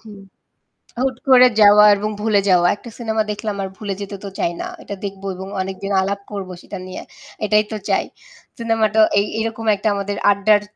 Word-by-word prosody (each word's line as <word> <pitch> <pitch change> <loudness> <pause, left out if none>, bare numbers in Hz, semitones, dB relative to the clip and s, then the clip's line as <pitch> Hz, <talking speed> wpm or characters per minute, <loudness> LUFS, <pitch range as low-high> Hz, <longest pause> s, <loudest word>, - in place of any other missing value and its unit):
হু। 220 - -16 0.9
হুট 260 -1 0
করে 255 -1 +8
যাওয়া 210 0 +8
এবং 210 +1 -2
ভুলে 215 -2 +3
যাওয়া। 175 -1 +4
একটা 235 - -12
সিনেমা 220 -2 0
দেখলাম 210 0 -4
আর 190 - -3
ভুলে 200 -1 -4
যেতে 200 0 -6
তো - - -4
চাই 170 - 0
না। - - -4 0.2
এটা 200 - -6
দেখবো 195 0 -6
এবং 190 +1 -7
অনেকদিন 195 +1 -4
আলাপ 200 +1 -2
করবো 195 -3 -5
সেটা 200 - -8
নিয়ে। 185 - -7 0.4
এটাই 210 0 +3
তো - - -2
চাই। - - +2 0.5
সিনেমাটা 225 -2 +1 0.2
এ - - +5 0.2
এরকম 225 0 -3
একটা 205 +2 -1
আমাদের 200 0 -3
আড্ডার 205 +1 +3
205 Hz, 185 wpm, -19 LUFS, 195-220 Hz, 0.9 s, করে